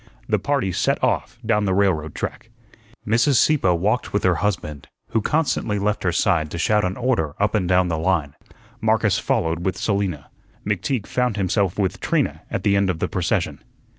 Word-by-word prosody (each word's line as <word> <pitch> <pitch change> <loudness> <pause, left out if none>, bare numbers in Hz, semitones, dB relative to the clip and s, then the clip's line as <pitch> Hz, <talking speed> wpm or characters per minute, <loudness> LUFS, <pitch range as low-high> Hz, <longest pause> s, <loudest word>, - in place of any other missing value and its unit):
The 105 -2 +1
party 135 -4 0
set - - 0
off 115 - 0
down 105 -1 +2
the 95 -1 +1
railroad 90 -6 +1
track. 115 - -5 0.6
Mrs. 115 +6 +3
Sieppe 145 -6 +3
walked 100 +8 0
with 105 - 0
her 90 - +4
husband, 80 -8 -2 0.2
who 110 - +1
constantly 145 -7 0
left 105 +1 0
her 90 - +1
side 80 -2 +1
to 85 - -6
shout 105 +5 +2
an 90 +1 -2
order 120 - 0
up 105 +1 +1
and 95 -5 0
down 90 0 +3
the 80 -2 -2
line. 80 -5 0 0.5
Marcus - - +2
followed 80 +1 -1
with 95 0 -1
Selina. 100 -9 -2 0.3
McTeague 105 +3 -1
found 125 -4 -1
himself 95 -1 0
with 95 -4 -1
Trina - - 0
at - - -3
the 100 -1 +3
end 100 -1 +2
of 90 - -1
the - - -1
procession. - - -1
100 Hz, 185 wpm, -22 LUFS, 85-105 Hz, 0.6 s, her